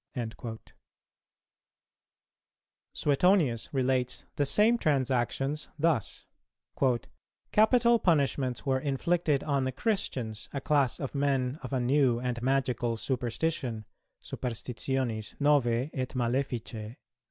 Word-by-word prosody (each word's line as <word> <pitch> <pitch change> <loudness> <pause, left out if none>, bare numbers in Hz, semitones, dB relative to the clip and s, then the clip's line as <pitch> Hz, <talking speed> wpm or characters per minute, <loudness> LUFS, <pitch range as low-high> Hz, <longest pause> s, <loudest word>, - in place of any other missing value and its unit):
Suetonius 145 - +2
relates 130 -2 0
the 145 -4 +1
same 220 +9 +4
transactions 135 - 0
thus: 155 -7 0 1.3
"Capital 235 +2 +4
punishments 140 - +1
were 135 -1 +1
inflicted 145 +2 0
on 140 -3 0
the 130 - -1
Christians, 130 - -2
a 140 - -2
class 140 -2 +1
of 135 - -4
men 140 -1 0
of 130 - -7
a 130 - 0
new 125 -1 +3
and 125 -1 -3
magical 125 -3 0
superstition 125 -1 -2 0.3
(superstitionis 120 -1 -3
novæ 140 -2 +2
et 130 -2 -2
maleficæ)." 120 -3 -2
135 Hz, 95 wpm, -29 LUFS, 125-150 Hz, 1.3 s, same